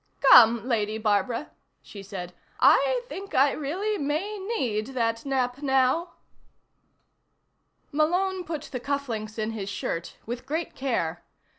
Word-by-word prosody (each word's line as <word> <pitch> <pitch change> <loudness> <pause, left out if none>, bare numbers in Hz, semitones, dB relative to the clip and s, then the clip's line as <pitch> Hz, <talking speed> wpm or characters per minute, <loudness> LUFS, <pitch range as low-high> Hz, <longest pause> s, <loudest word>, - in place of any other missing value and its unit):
"Come, 235 +1 +7
Lady 215 -3 0
Barbara," 220 +5 0 0.3
she 200 - -10
said. 185 -3 -7 0.3
"I - - +4
think 395 -4 -7
I 275 +2 +5
really 380 +10 -2
may 320 +9 -2 0.2
need 225 +1 -2
that 230 +1 -1
nap, 260 0 -1
now." 270 +5 +2 1.8
Malone 360 +5 +1
put 315 -4 -5
the 260 -4 -6
cufflinks 240 -6 -3
in 215 0 -2
his 205 -3 -5
shirt 170 -3 -4
with 240 +2 -6
great 320 +4 -3
care. 175 -11 -2
260 Hz, 125 wpm, -26 LUFS, 220-310 Hz, 1.8 s, Come